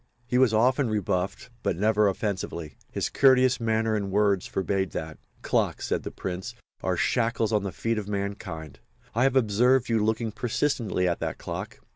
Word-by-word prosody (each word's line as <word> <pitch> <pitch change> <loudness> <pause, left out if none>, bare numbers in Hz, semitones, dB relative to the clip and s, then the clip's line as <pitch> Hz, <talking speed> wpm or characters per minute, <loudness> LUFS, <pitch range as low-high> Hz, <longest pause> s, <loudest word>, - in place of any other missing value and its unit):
He 125 +1 +1
was 130 -3 +5
often 125 +3 +3
rebuffed 100 +1 -2
but 85 - -1
never 105 +1 +3
offensively. 95 -7 -3 0.2
His - - -1
courteous 130 -2 +4
manner 110 -1 +1
and 100 -2 -2
words 100 -1 +2
forbade 95 -2 -1
that. 80 0 -5 0.2
"Clocks," - - 0
said - - 0
the - - -5
Prince, 90 0 -5 0.3
"are - - 0
shackles 115 -2 +1
on 105 - +3
the 100 -1 -3
feet 115 +5 -1
of 100 - -6
mankind. 100 -7 -5 0.3
I 115 - 0
have 135 0 +3
observed 125 +2 +3
you 115 -2 +2
looking 110 +1 0
persistently 110 -3 0
at 85 - 0
that - - -3
clock. - - -6
105 Hz, 170 wpm, -27 LUFS, 95-115 Hz, 0.3 s, was